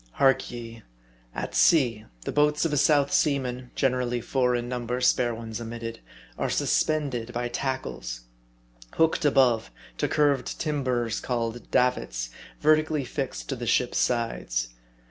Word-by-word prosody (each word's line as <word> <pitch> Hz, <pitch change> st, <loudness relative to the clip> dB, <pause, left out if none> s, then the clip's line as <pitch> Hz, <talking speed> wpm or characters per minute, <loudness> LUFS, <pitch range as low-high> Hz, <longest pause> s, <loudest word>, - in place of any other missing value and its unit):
Hark 135 Hz, -1 st, +3 dB
ye:' 115 Hz, -1 st, -8 dB, 0.5 s
At -, -, -4 dB
sea, 120 Hz, -10 st, +4 dB, 0.2 s
the -, -, -4 dB
boats 150 Hz, +1 st, +2 dB
of 160 Hz, -, 0 dB
a -, -, +3 dB
South 145 Hz, -1 st, +3 dB
Sea 145 Hz, -3 st, +3 dB
man 125 Hz, -1 st, -5 dB
(generally 125 Hz, -2 st, +1 dB
four 125 Hz, +1 st, +1 dB
in 120 Hz, 0 st, -2 dB
number, 125 Hz, 0 st, -3 dB
spare 125 Hz, -2 st, +2 dB
ones 115 Hz, 0 st, -6 dB
omitted,) 115 Hz, 0 st, -6 dB, 0.4 s
are -, -, 0 dB
suspended 135 Hz, -7 st, 0 dB
by 120 Hz, 0 st, -1 dB
tackles, 120 Hz, -, -4 dB, 0.7 s
hooked 160 Hz, -1 st, +2 dB
above, 130 Hz, -, +3 dB, 0.3 s
to -, -, +1 dB
curved 145 Hz, -4 st, +1 dB
timbers 130 Hz, -7 st, -1 dB
called 120 Hz, -1 st, -3 dB
"davits," -, -, 0 dB, 0.3 s
vertically 155 Hz, -1 st, +3 dB
fixed 135 Hz, +1 st, -4 dB
to 135 Hz, -, -1 dB
the 120 Hz, -1 st, -5 dB
ship's 125 Hz, +1 st, +2 dB
sides. 115 Hz, -, 0 dB
125 Hz, 140 wpm, -26 LUFS, 115-140 Hz, 0.7 s, sea